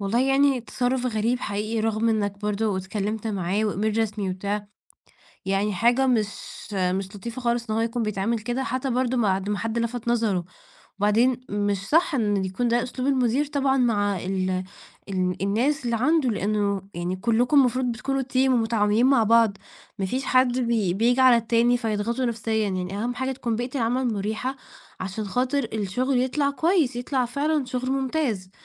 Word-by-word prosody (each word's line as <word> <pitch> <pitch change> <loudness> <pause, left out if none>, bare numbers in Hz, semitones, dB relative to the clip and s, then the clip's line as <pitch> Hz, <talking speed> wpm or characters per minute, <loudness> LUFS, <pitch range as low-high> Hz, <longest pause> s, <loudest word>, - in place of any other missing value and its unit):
والله 205 +5 +1
يعني 270 -1 +3
تصرف 250 +2 -1
غريب 235 +2 0
حقيقي، 215 +2 -2
رغم 225 +1 +1
إنك 205 -2 0
برضو 210 -1 -1
اتكلمت 205 +3 -3
معاه 195 0 -1
وemail 215 +1 -1
رسمي 210 -3 -1
وبتاع، 200 +2 -3 0.8
يعني 195 +2 0
حاجه 240 +7 +3
مش 230 -4 +3 0.5
مش 190 +1 -1
لطيفة 235 +5 -6
خالص 235 -1 -1
إن 215 - 0
هو 225 - +1
يكون 230 0 -1
بيتعامل 215 +2 -1
كده، 240 +4 -2
حتّى 260 +1 -2
برضو 255 0 0
بعد 195 -3 +1
ما 205 - 0
حد 225 +1 -2
لفت 235 0 -3
نظره، 220 -7 +1 0.5
وبعدين 230 +5 +3
مش 205 -1 -1
صح 325 -1 +3
إن 205 -5 +1
يكون 190 +6 -1
ده 240 0 +2
أسلوب 255 +2 -3
المدير 260 +1 +2
طبعًا 275 -2 +1
مع 205 -5 +1
ال 185 0 -2 0.4
ال 185 -1 -1
الناس 250 +8 +1
اللي 235 -1 0
عنده، 280 +1 +2
لأنه 205 -2 0
يعني 175 +2 -3
كلكم 240 +7 +1
المفروض 255 0 +2
بتكونوا 270 +4 -2
team 260 +1 +1
ومتعاونين 225 -1 +2
مع 265 -4 +4
بعض، 225 -2 +4 0.4
ما 190 - -1
فيش 260 +7 -2
حد 255 0 +3
بي 230 -7 +1
بييجي 240 +5 +2
على 255 -2 +7
التاني 235 +1 +2
فيضغطه 230 +2 -1
نفسيًا 230 -1 -2 0.2
يعني، 185 +1 -3
أهم 245 +1 -2
حاجه 260 +1 -2
تكون 235 -3 -2
بيئة 245 +3 -4
العمل 245 0 0
مُريحة 220 +6 -3 0.4
عشان 190 +3 -4
خاطر 250 +4 -1
الشغل 245 +6 0
يطلع 280 +2 0
كويس، 315 -4 +1
يطلع 250 +1 -1
فعلًا 285 +3 0
شغل 255 +1 -3
ممتاز، 260 -8 -1
230 Hz, 170 wpm, -24 LUFS, 205-255 Hz, 0.8 s, على